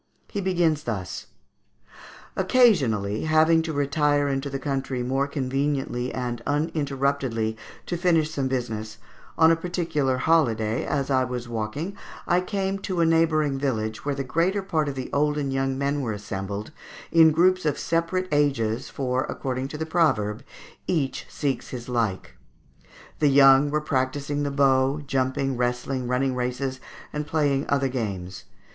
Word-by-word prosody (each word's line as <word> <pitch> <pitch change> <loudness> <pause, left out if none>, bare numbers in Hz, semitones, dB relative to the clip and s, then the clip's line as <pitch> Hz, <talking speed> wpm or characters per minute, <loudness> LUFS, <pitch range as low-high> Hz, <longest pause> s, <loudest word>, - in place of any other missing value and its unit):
He 200 - -2
begins 175 -5 +1
thus: 100 -6 -4 1.1
"Occasionally, 140 - +3
having 160 +1 +4
to 160 0 -3
retire 145 0 +1
into 135 0 -2
the 135 - -3
country 135 -2 -2
more 135 +3 0
conveniently 135 -2 -1
and 120 -2 -3
uninterruptedly 140 -6 -1 0.3
to 175 - -3
finish 165 -3 +2
some 140 -4 -1
business, 110 -4 -3 0.4
on 160 0 +6
a - - +5
particular 165 -6 -1
holiday, 120 -8 +2
as 140 -2 -1
I 130 -1 +3
was 125 -1 -5
walking 120 - -4 0.3
I 175 +1 +2
came 195 0 -2
to 190 -2 -3
a - - +4
neighbouring 155 -4 +2
village, 110 -5 -2
where 145 -1 -1
the 135 - -2
greater 175 +9 0
part 155 -6 0
of 140 - -5
the 130 -1 -5
old 150 +1 +2
and 140 -2 -1
young 135 0 0
men 140 +1 0
were 115 -5 -2
assembled, 100 +2 -5 0.4
in 165 -1 +7
groups 185 +4 +3
of 150 -2 0
separate 170 +3 -1
ages, 135 -5 +1
for, 130 -1 -1
according 130 0 -3
to 150 - -7
the 160 - -3
proverb, 130 -10 +1 0.4
'Each 145 -7 -1
seeks 140 -3 -2
his 120 -2 -7
like.' 115 -6 -2 0.8
The 150 - +4
young 135 +1 +6
were 150 +1 0
practising 140 +1 -1
the 145 - 0
bow, 135 0 +2
jumping, 135 0 -1
wrestling, 125 +1 -1
running 130 +1 +1
races, 125 +1 -2 0.3
and 150 0 -3
playing 145 -3 +1
other 140 -1 +2
games. 100 -8 -4
140 Hz, 150 wpm, -25 LUFS, 125-155 Hz, 1.1 s, in